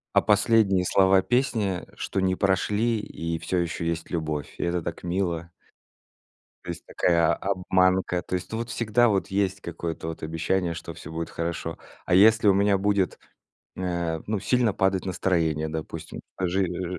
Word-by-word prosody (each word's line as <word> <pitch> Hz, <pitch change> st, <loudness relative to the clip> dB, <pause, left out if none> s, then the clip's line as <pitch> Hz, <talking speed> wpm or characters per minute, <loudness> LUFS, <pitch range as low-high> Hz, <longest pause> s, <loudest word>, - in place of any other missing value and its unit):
А -, -, +6 dB
последние 105 Hz, -3 st, +3 dB
слова 95 Hz, 0 st, +4 dB
песни, 110 Hz, -6 st, 0 dB
что 95 Hz, -, -2 dB
не 95 Hz, 0 st, +2 dB
прошли 105 Hz, +4 st, +1 dB
и 85 Hz, -4 st, -4 dB
всё 90 Hz, -, -2 dB
ещё 85 Hz, -1 st, -2 dB
есть 85 Hz, 0 st, -2 dB
любовь, 80 Hz, -3 st, -3 dB
и -, -, -2 dB
это 85 Hz, 0 st, 0 dB
так 85 Hz, +2 st, -6 dB
мило. 85 Hz, -2 st, -2 dB, 1.1 s
То -, -, -3 dB
есть -, -, -8 dB
такая 85 Hz, -2 st, +2 dB
обманка. 95 Hz, -1 st, +1 dB
То -, -, -8 dB
есть 90 Hz, 0 st, -3 dB
ну 110 Hz, -, -2 dB
вот 115 Hz, 0 st, -4 dB
всегда 115 Hz, +1 st, +2 dB
вот 100 Hz, -3 st, +1 dB
есть 100 Hz, 0 st, -1 dB
какое-то 85 Hz, -2 st, -5 dB
вот 80 Hz, -1 st, -6 dB
обещание, 85 Hz, +2 st, -1 dB
что -, -, -8 dB
всё -, -, -10 dB
будет 80 Hz, +1 st, -4 dB
хорошо. 85 Hz, +1 st, -4 dB, 0.3 s
А -, -, +3 dB
если 110 Hz, +3 st, +6 dB
у 100 Hz, -, +6 dB
меня 100 Hz, 0 st, +3 dB
будет, 100 Hz, -1 st, +1 dB, 0.6 s
э, 85 Hz, -3 st, -2 dB
ну, 105 Hz, -1 st, -1 dB
сильно 125 Hz, 0 st, +2 dB
падать 95 Hz, -1 st, +1 dB
настроение, 85 Hz, -4 st, 0 dB
допустим 80 Hz, 0 st, -6 dB, 0.2 s
Жи 95 Hz, +1 st, +1 dB
э, -, -, 0 dB, 0.3 s
жи 90 Hz, -, -4 dB
95 Hz, 170 wpm, -26 LUFS, 85-100 Hz, 1.1 s, А